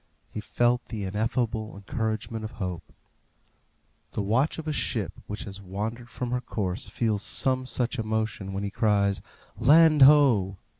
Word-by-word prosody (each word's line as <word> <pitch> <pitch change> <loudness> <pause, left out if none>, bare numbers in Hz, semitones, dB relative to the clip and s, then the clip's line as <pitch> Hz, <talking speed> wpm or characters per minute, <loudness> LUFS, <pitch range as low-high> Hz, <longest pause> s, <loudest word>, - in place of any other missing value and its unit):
He - - -5
felt 120 +2 +1
the 110 -4 -5
ineffable 110 +2 -1
encouragement 110 +2 -3
of 110 - -6
hope. 90 -5 -5 1.2
The 105 - -1
watch 120 +9 +1
of 160 -1 -6
a 155 - 0
ship - - -1
which 105 - -5
has 100 0 -9
wandered 110 +6 -5
from 120 +1 -4
her 125 0 0
course 100 -5 -3
feels 110 -4 0
some 130 +3 -1
such 125 0 -2
emotion 110 -3 -2
when 100 +1 -3
he 100 - -3
cries, 100 -3 +2 0.4
"Land 155 +2 +6
ho!" 130 -10 +6
110 Hz, 150 wpm, -27 LUFS, 100-125 Hz, 1.2 s, Land